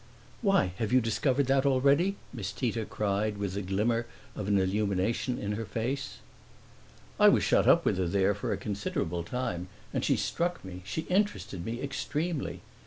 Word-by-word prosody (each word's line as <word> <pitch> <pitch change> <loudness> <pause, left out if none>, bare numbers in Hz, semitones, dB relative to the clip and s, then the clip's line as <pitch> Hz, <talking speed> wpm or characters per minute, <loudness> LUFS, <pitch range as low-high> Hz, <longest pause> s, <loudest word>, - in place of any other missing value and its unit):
"Why, 195 - +3
have 110 0 -1
you 130 - +6
discovered 130 +4 +1
that 135 +1 +3
already?" 140 +8 +3 0.2
Miss 110 -5 -4
Tita 115 -1 -2
cried 105 0 -1
with 100 -2 -2
the 100 - -2
glimmer 110 +5 0 0.3
of 105 - -4
an 100 -1 +3
illumination 100 +5 0
in 100 - -3
her 110 +2 -2
face. 130 +5 -3 1.0
"I - - +8
was - - +3
shut - - +3
up - - +6
with 95 - +2
her 90 - +1
there 95 +3 +2
for 105 - -3
a - - 0
considerable 100 -4 -2
time, 90 -4 -3 0.3
and - - -1
she - - +3
struck 175 - -1
me, 90 -1 -8
she 105 +11 -2
interested 155 - -1
me 120 +6 -4
extremely. 150 +3 -2
110 Hz, 175 wpm, -29 LUFS, 100-135 Hz, 1.0 s, I